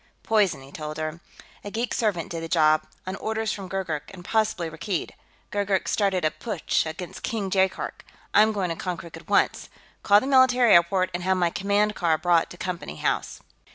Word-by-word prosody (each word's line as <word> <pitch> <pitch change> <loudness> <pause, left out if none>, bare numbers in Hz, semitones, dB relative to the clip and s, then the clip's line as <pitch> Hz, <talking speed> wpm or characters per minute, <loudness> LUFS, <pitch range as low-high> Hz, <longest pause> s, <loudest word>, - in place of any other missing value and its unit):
"Poison," 205 -10 +2
he 135 - -14
told 155 0 -6
her. 155 +1 -4 0.4
"A 205 - -5
geek 230 +4 -2
servant 200 -8 -1
did 165 -1 -4
the 165 - -4
job, 155 -2 +3 0.2
on 185 +1 -4
orders 220 0 -2
from 195 -2 -7
Gurgurk 175 -6 -3
and 180 -2 -12
possibly 215 -6 0
Rakkeed. 165 +3 -3 0.4
Gurgurk's 200 -2 0
started 195 -5 +1
a 155 - +2
putsch 200 -7 -1
against 165 +2 -7
King 205 -4 -3
Jaikark; 190 0 0 0.3
I'm 215 +1 +6
going 195 -4 -1
to - - -2
Konkrook 170 -1 -5
at - - -13
once. - - +2 0.3
Call 205 0 +6
the 260 - -5
military 255 -4 +5
airport 185 +2 +4
and 175 - -3
have 190 +1 +1
my 175 -2 +2
command 205 +3 +1
car 165 -6 +1
brought 170 +1 +2
to 175 - -11
Company 175 - -5
House." - - -2
185 Hz, 190 wpm, -25 LUFS, 165-205 Hz, 0.4 s, I'm